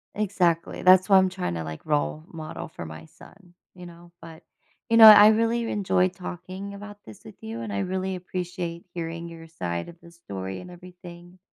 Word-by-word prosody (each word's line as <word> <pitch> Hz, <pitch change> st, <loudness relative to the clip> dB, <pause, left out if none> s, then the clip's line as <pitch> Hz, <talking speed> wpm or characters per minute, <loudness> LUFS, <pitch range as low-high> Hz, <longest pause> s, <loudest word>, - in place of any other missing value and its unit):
Exactly, 180 Hz, -5 st, -1 dB
that's 185 Hz, 0 st, +6 dB
why 195 Hz, -2 st, +6 dB
I'm 190 Hz, 0 st, +4 dB
tryna, 85 Hz, -, -4 dB
like, 80 Hz, -, -8 dB
role 155 Hz, +1 st, -1 dB
model 160 Hz, -2 st, -7 dB
for 85 Hz, -, -9 dB
my 80 Hz, 0 st, -10 dB
son, 180 Hz, -, -19 dB, 0.2 s
you 180 Hz, -1 st, -12 dB
know, 170 Hz, 0 st, -14 dB
but 165 Hz, -1 st, -13 dB, 0.5 s
you 230 Hz, -, +3 dB
know, 225 Hz, -, +10 dB
I 210 Hz, -1 st, +10 dB
really 230 Hz, +1 st, +1 dB
enjoyed 185 Hz, -2 st, +1 dB
talking 185 Hz, +2 st, -8 dB
about 205 Hz, +1 st, -10 dB
this 110 Hz, -, -13 dB
with 110 Hz, -, -13 dB
you, 115 Hz, +1 st, -7 dB
and 110 Hz, -, -6 dB
I 100 Hz, -, -2 dB
really 190 Hz, -, -3 dB
appreciate 175 Hz, -1 st, -6 dB
hearing 170 Hz, 0 st, -6 dB
your 165 Hz, -1 st, -12 dB
side 85 Hz, -, -5 dB
of 170 Hz, -, -12 dB
the 170 Hz, -, -16 dB
story 95 Hz, -, -7 dB
and 180 Hz, -, -11 dB
everything. 175 Hz, 0 st, -13 dB
175 Hz, 190 wpm, -25 LUFS, 160-190 Hz, 0.5 s, know